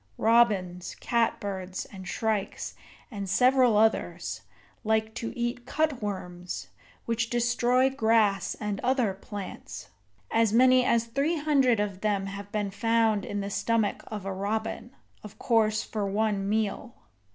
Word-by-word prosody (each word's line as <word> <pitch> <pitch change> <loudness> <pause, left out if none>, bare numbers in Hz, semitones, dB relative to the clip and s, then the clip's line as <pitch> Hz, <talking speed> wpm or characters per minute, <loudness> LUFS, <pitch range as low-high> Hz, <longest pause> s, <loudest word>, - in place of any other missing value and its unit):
Robins, 205 -6 +2
cat 235 -1 0
birds, 190 -2 -5
and 190 -2 -9
shrikes, 215 -2 -2 0.4
and 200 -3 -5
several 250 0 +4
others, 220 +1 +1 0.4
like 220 0 +1
to 230 0 -4
eat 240 +1 -3
cutworms, 185 - -3 0.4
which 230 0 -1
destroy 245 +1 +2
grass 220 -7 +2
and 210 -2 -3
other 250 -5 +1
plants. 195 0 -8 0.4
As 225 -2 +3
many 255 +1 +6
as 235 -2 +2
three 275 +8 0
hundred 275 -6 +3
of 200 -2 -2
them 205 -2 0
have 200 +1 -7
been 205 -2 -2
found 225 -1 +2
in 205 0 -3
the 200 0 -4
stomach 215 +1 0
of 210 -3 -6
a 195 - -2
robin, 220 +4 -3 0.3
of 210 - -11
course 220 -2 +2
for 210 -2 -3
one 200 -1 0
meal. 220 +3 -1
220 Hz, 135 wpm, -27 LUFS, 200-235 Hz, 0.4 s, many